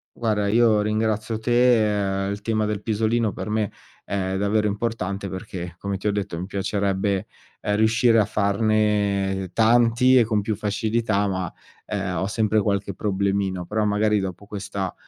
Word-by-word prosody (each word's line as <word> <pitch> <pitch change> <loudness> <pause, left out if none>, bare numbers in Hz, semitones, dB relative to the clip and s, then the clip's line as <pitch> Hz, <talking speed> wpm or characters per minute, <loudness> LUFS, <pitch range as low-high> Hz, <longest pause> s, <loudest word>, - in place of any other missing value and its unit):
Guarda 105 -3 0
io 110 -1 +4
ringrazio 110 +1 -1
te, 110 -5 +2
ehm, 100 - -2
il 100 - -5
tema 110 0 0
del 105 -1 -2
pisolino 110 0 0
per - - -6
me 110 -2 0 0.3
è 95 -1 -2
davvero 105 +2 +1
importante, 100 -2 -3
perché 90 -2 -7
come 100 +1 -3
ti 100 - -4
ho - - +3
detto 100 -4 -3
mi 90 - -5
piacerebbe, 100 0 -1 0.3
ehm, 105 - 0
riuscire 115 +2 +3
a 105 - +3
farne 100 -2 +1
tanti 120 +3 +4
e 120 - +6
con 105 -2 0
più 105 +1 -2
facilità 105 0 0
ma, 95 -3 -3 0.3
ehm, 100 -3 -3
ho 95 - 0
sempre 110 0 +1
qualche 100 -1 -1
problemino. 100 -2 -1
Però 105 0 0
magari 105 0 +2
dopo 95 +1 -5
questa, 100 -2 -4
105 Hz, 160 wpm, -23 LUFS, 100-110 Hz, 0.3 s, e